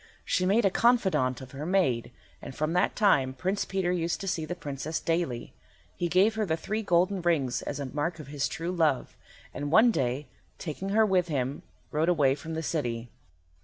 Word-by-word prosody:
She 185 - +1
made 210 +3 +3
a 195 - +4
confidante 190 - +2
of 130 -1 -10
her 140 +2 -6
maid, 150 -10 +1 0.3
and 130 - -8
from 155 +2 -1
that 180 - +2
time 135 -11 +3
Prince 190 +8 -1
Peter 190 -2 -1
used 170 -1 -1
to 195 - -5
see 160 -4 -1
the 175 - -4
Princess 150 0 -4
daily. 165 -9 -2 0.4
He 175 - -1
gave 190 +6 +4
her 220 0 -1
the 160 -5 0
three 215 +6 -3
golden 185 0 +2
rings 155 -8 +1
as 145 - -5
a 140 - -3
mark 150 +5 -2
of 155 - -8
his 145 0 -1
true 170 +2 -4
love, 160 -7 +1 0.4
and 145 0 -4
one 220 +7 +6
day, 130 - -1 0.3
taking 180 +4 -5
her 220 +2 +4
with 185 -3 +2
him, 140 -3 -2 0.3
rode 155 +3 +1
away 145 -6 +4
from 160 +3 -6
the 160 - -3
city. 120 -7 -2
165 Hz, 200 wpm, -28 LUFS, 140-185 Hz, 0.4 s, one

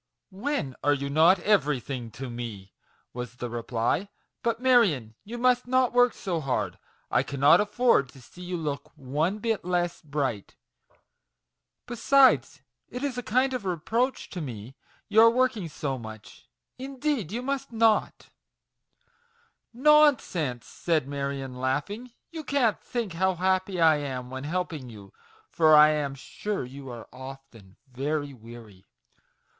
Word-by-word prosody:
"When 190 - -3
are 145 0 +4
you 140 0 -4
not 165 +6 +5
everything 140 - 0
to 135 +1 -6
me?" 115 -5 -7 0.4
was 125 0 -6
the 120 -1 -6
reply. 120 - -1 0.2
" - - -54
But, 230 -1 -1
Marion, 210 - +3
you 235 +4 -7
must 250 0 +2
not 255 -1 +2
work 245 0 +4
so 180 -6 -3
hard; 135 -3 -2 0.3
I - - +3
cannot 140 +7 +4
afford 210 - +2
to 135 - -15
see 180 - -15
you 180 0 -4
look 150 -3 -4
one 150 +8 -1
bit 225 0 -1
less 175 -1 -1
bright. 140 - -3 1.3
Besides, 255 +3 +3 0.3
it 250 +2 -6
is 265 -4 -2
a - - -3
kind 255 +3 +1
of 250 - -3
reproach 220 - -1
to 180 - -5
me 120 -2 -7 0.3
your 220 +2 +7
working 235 -7 0
so 140 -3 -4
much; 110 -2 -11 0.3
indeed 270 - -2
you 240 +3 -3
must 275 -1 -3
not 225 -1 +1 0.7
\" 470 0 -40
"Nonsense!" 245 - +3
said 160 -6 -1
Marion, 140 -2 -4
laughing; 150 - -2 0.2
"you 320 -2 -6
can't 260 -7 +1
think 230 -7 -4
how 190 +2 +1
happy 185 +1 0
I 160 -2 +5
am 130 -3 -5
when 130 +1 -6
helping 160 -5 -3
you, 100 -4 -13 0.3
for 155 -2 +5
I 150 0 +8
am 145 -2 -2
sure 200 +5 -4
you 135 +1 -10
are 120 -2 -9
often 130 -7 -12
very 145 +3 -3
weary 115 -5 -13
160 Hz, 145 wpm, -27 LUFS, -, 1.3 s, I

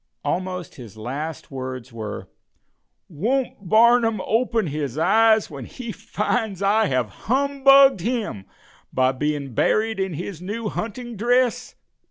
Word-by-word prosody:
Almost 180 -1 -3
his 115 -5 -11
last 140 +9 -5
words 130 -2 -6
were: 110 -3 -6 0.8
"Won't 210 - -2
Barnum 230 +1 +5
open 230 -1 +1
his 145 -3 -4
eyes 220 +5 +4
when 135 -4 -7
he 235 - -7
finds 220 -2 -2
I 210 +2 +3
have 130 -6 0 0.2
humbugged 275 -1 +5
him 210 - -3 0.5
by 130 0 +2
being 140 -1 -3
buried 220 - +1
in 190 -4 -2
his 175 +1 -6
new 210 +4 -4
hunting 235 +3 -5
dress?" 245 +3 +1
200 Hz, 125 wpm, -23 LUFS, 145-230 Hz, 0.8 s, Barnum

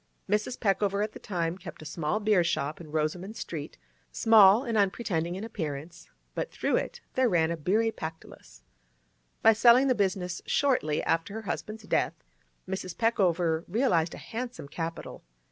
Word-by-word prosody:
Mrs. 210 +4 -1
Peckover 200 -1 +1
at 215 - -3
that - - -12
time 175 -2 -2
kept 175 -3 -9
a - - -12
small 160 +5 -2
beer 210 -4 +3
shop 155 -2 -2
in 155 -3 -11
Rosoman 165 +7 -2
Street—small 200 - +2
and 235 -4 -2
unpretending 190 -4 0
in 195 - -5
appearance, 160 -7 -6 0.2
but - - -3
through - - -1
it - - -4
there 260 -2 +3
ran 165 -3 +2
a - - -1
beery 210 +8 +1
Pactolus. 160 -5 -9 0.8
By 225 - +8
selling 235 +4 +6
the 265 - +4
business 185 -4 -1
shortly 250 - +1
after 165 +5 -1
her 220 - -5
husband's 215 +1 -5
death, - - 0 0.5
Mrs. 185 -2 -5
Peckover 175 -8 +2
realised 175 -6 +1
a - - -9
handsome 235 - -6
capital. 165 +3 -6
190 Hz, 155 wpm, -28 LUFS, 165-220 Hz, 0.8 s, By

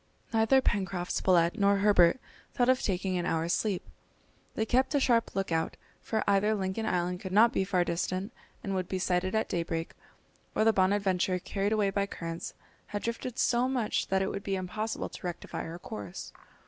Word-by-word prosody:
Neither 225 +4 +4
Pencroft, 185 -6 -1
Spilett, 175 -1 +2
nor 200 0 +4
Herbert 200 0 +5 0.4
thought 245 0 +3
of 255 0 +4
taking 185 -1 -1
an 175 - -2
hour's 165 +1 0
sleep. 205 -5 -1 0.7
They 220 - 0
kept 260 +5 +2
a - - +4
sharp 235 -6 +2
look 195 -2 -1
out, 160 0 -1 0.2
for 220 -1 -1
either 200 +2 +3
Lincoln 195 +3 -2
Island 180 0 0
could 190 -1 -6
not 230 +5 +5
be 190 - +1
far 185 -2 +1
distant 185 +5 -2 0.3
and 195 - -2
would 185 -2 -1
be 190 - -2
sighted 185 +1 0
at 220 - +1
daybreak, 165 -1 -2 0.6
or - - +3
the 225 0 +5
Bonadventure, 190 -1 +2
carried 195 +3 -2
away 210 -2 +2
by 200 0 0
currents, 165 -3 -6 0.3
had 205 0 -4
drifted 235 +1 -4
so 245 +1 +2
much 245 -5 0
that 190 0 +1
it 190 - -1
would - - -4
be 195 - -1
impossible 200 +4 -3
to - - -11
rectify 175 - -5
her 165 +1 -6
course. 105 - -8
195 Hz, 185 wpm, -30 LUFS, 180-220 Hz, 0.7 s, Herbert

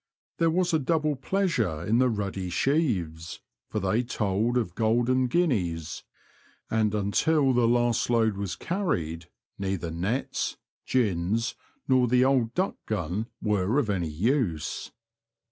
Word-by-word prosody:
There 165 - +4
was 180 +1 +1
a 160 - +4
double 155 +1 +1
pleasure 130 - -1
in 115 +5 +2
the 130 0 +4
ruddy 100 -4 -3
sheaves, 90 - 0 0.3
for 110 - -2
they 100 +4 +1
told 115 0 0
of 110 -8 -1
golden 120 +4 +2
guineas, 95 - 0 0.7
and 110 -1 +1
until 135 +8 +2
the 120 -1 +3
last 120 -1 +2
load 115 -3 +2
was 100 -2 -3
carried 85 - -2 0.3
neither 95 -4 -2
nets, 95 +11 -2 0.3
gins, 110 -1 +1 0.3
nor 130 -2 +4
the 125 +2 +4
old 125 -4 +2
duck 185 +2 0
gun 105 +1 -2 0.2
were 105 +2 +1
of 120 -8 +1
any 90 -5 -1
use. 90 - -1
115 Hz, 130 wpm, -27 LUFS, 95-130 Hz, 0.7 s, There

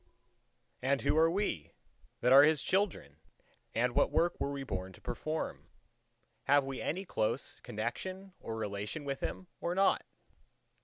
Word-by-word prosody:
And 135 +2 +2
who - - +2
are 160 +1 +5
we 165 - -2 0.5
that 125 +1 +5
are 135 - +11
His 150 -1 +4
children 185 - 0 0.6
and 120 +1 +2
what - - +4
work 170 +1 +1
were 140 - -1
we 140 -1 -4
born 95 -6 -4
to - - -15
perform? 155 +1 -4 0.8
Have 145 0 +5
we 135 -1 -5
any 185 +5 -2
close 110 -10 -1
connection 190 0 -4
or 115 - -5
relation 105 +7 -3
with 135 -1 -2
Him 190 - -4
or 175 +1 -1
not? 195 +1 +3
140 Hz, 150 wpm, -33 LUFS, 115-175 Hz, 0.8 s, are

